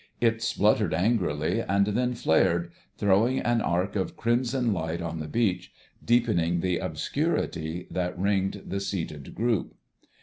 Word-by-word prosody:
It 115 Hz, -1 st, +2 dB
spluttered 105 Hz, -4 st, +2 dB
angrily 90 Hz, -3 st, +1 dB
and 100 Hz, -2 st, +2 dB
then 125 Hz, +4 st, 0 dB
flared, 85 Hz, -3 st, +2 dB, 0.3 s
throwing 105 Hz, +6 st, +3 dB
an 120 Hz, -1 st, +1 dB
arc 90 Hz, +4 st, 0 dB
of 95 Hz, -2 st, -2 dB
crimson 120 Hz, 0 st, +1 dB
light 80 Hz, -1 st, -3 dB
on 85 Hz, -1 st, -4 dB
the 75 Hz, -, -5 dB
beach, 95 Hz, +3 st, 0 dB, 0.3 s
deepening 105 Hz, -8 st, +2 dB
the 90 Hz, -1 st, 0 dB
obscurity 80 Hz, +3 st, -2 dB
that 90 Hz, -1 st, -2 dB
ringed 95 Hz, +1 st, 0 dB
the 100 Hz, -, -3 dB
seated 85 Hz, -7 st, -5 dB
group. 115 Hz, -3 st, 0 dB
100 Hz, 135 wpm, -27 LUFS, 85-115 Hz, 0.3 s, throwing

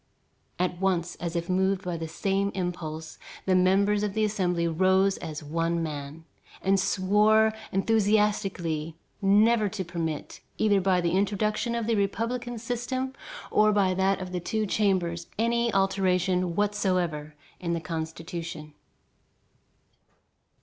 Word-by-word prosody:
At 180 Hz, 0 st, -1 dB
once, 185 Hz, -3 st, +1 dB
as 170 Hz, 0 st, -4 dB
if 170 Hz, 0 st, -2 dB
moved 190 Hz, +1 st, +1 dB
by 180 Hz, -2 st, -3 dB
the 165 Hz, -1 st, -4 dB
same 195 Hz, +4 st, -1 dB
impulse, 160 Hz, -4 st, -4 dB, 0.3 s
the 190 Hz, -, +2 dB
members 195 Hz, +3 st, +3 dB
of 210 Hz, -1 st, -2 dB
the 220 Hz, -, +2 dB
Assembly 180 Hz, -5 st, 0 dB
rose 190 Hz, +3 st, +3 dB
as 155 Hz, 0 st, -6 dB
one 165 Hz, +2 st, -1 dB
man, 150 Hz, +1 st, -6 dB, 0.4 s
and 195 Hz, +1 st, +3 dB
swore 210 Hz, +4 st, +3 dB, 0.2 s
enthusiastically 195 Hz, -6 st, +1 dB, 0.3 s
never 210 Hz, +2 st, +4 dB
to 190 Hz, -1 st, -4 dB
permit, 165 Hz, -3 st, -4 dB, 0.2 s
either 205 Hz, -2 st, +3 dB
by 185 Hz, -1 st, +2 dB
the 170 Hz, -1 st, 0 dB
introduction 210 Hz, +4 st, 0 dB
of 235 Hz, -1 st, -1 dB
the 230 Hz, -, +1 dB
republican 230 Hz, +4 st, -1 dB
system 245 Hz, +3 st, -3 dB, 0.4 s
or 215 Hz, 0 st, +4 dB
by 195 Hz, -3 st, +2 dB
that 190 Hz, +1 st, +1 dB
of 185 Hz, -1 st, -6 dB
the 180 Hz, -, -2 dB
Two 215 Hz, +5 st, -1 dB
Chambers, 185 Hz, -5 st, 0 dB
any 235 Hz, +1 st, +1 dB
alteration 185 Hz, -2 st, +1 dB
whatsoever 185 Hz, -7 st, 0 dB, 0.2 s
in 170 Hz, -1 st, -2 dB
the 170 Hz, -, -1 dB
Constitution. 165 Hz, -1 st, -6 dB
190 Hz, 130 wpm, -27 LUFS, 170-210 Hz, 0.4 s, never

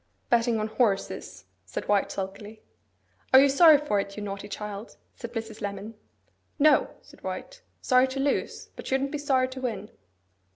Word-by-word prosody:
'Betting 235 Hz, -1 st, +3 dB
on 215 Hz, -, -1 dB
horses,' 215 Hz, -3 st, -1 dB, 0.2 s
said -, -, -6 dB
White 205 Hz, -1 st, +2 dB
sulkily. 205 Hz, +3 st, -7 dB, 0.7 s
'Are -, -, +11 dB
you 280 Hz, -, +6 dB
sorry 305 Hz, +2 st, +7 dB
for 280 Hz, -8 st, 0 dB
it, 200 Hz, 0 st, -5 dB
you 210 Hz, -, -4 dB
naughty 200 Hz, 0 st, -6 dB
child?' 210 Hz, +1 st, -7 dB, 0.2 s
said 235 Hz, -, -8 dB
Mrs. 225 Hz, -2 st, -6 dB
Lemon. 205 Hz, +2 st, -5 dB, 0.6 s
'No,' 305 Hz, 0 st, +4 dB
said -, -, -18 dB
White. -, -, -6 dB, 0.2 s
'Sorry 255 Hz, 0 st, +4 dB
to 260 Hz, +1 st, -5 dB
lose, 280 Hz, +1 st, -1 dB
but -, -, -9 dB
shouldn't 270 Hz, +1 st, 0 dB
be 295 Hz, -, -3 dB
sorry 265 Hz, -3 st, +2 dB
to 260 Hz, 0 st, -8 dB
win. 210 Hz, -5 st, -4 dB
230 Hz, 165 wpm, -27 LUFS, 205-270 Hz, 0.7 s, Are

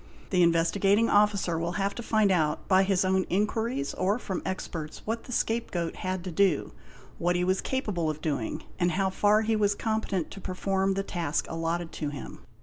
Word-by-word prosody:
The 180 Hz, -2 st, +3 dB
Investigating 195 Hz, +6 st, +3 dB
Officer 205 Hz, -5 st, +3 dB
will 170 Hz, +1 st, -2 dB
have 200 Hz, 0 st, -1 dB
to -, -, -6 dB
find 215 Hz, -3 st, +2 dB
out, 155 Hz, -4 st, +1 dB
by 190 Hz, -1 st, +5 dB
his 190 Hz, -1 st, +2 dB
own 190 Hz, 0 st, +2 dB
inquiries 210 Hz, -, 0 dB
or 195 Hz, +4 st, +1 dB
from 190 Hz, -7 st, -4 dB
experts, 160 Hz, -4 st, -5 dB
what 225 Hz, +1 st, -3 dB
the -, -, -9 dB
scapegoat 225 Hz, -8 st, -1 dB
had 185 Hz, -1 st, -3 dB
to 185 Hz, -, -5 dB
do, 180 Hz, -2 st, +2 dB, 0.5 s
what 175 Hz, +1 st, +1 dB
he 175 Hz, -, +1 dB
was 185 Hz, +1 st, +1 dB
capable 205 Hz, -, -1 dB
of 155 Hz, 0 st, -3 dB
doing, 140 Hz, -8 st, -2 dB, 0.2 s
and 175 Hz, -1 st, +2 dB
how 190 Hz, +1 st, +1 dB
far 210 Hz, +2 st, +3 dB
he 220 Hz, 0 st, +1 dB
was 205 Hz, -1 st, +2 dB
competent 220 Hz, -6 st, -2 dB
to 195 Hz, -, -9 dB
perform 190 Hz, +1 st, 0 dB
the 195 Hz, -, -1 dB
task 170 Hz, -6 st, -2 dB
allotted 165 Hz, +1 st, -2 dB
to 150 Hz, -, -3 dB
him. 145 Hz, -2 st, -8 dB
190 Hz, 190 wpm, -28 LUFS, 170-205 Hz, 0.5 s, by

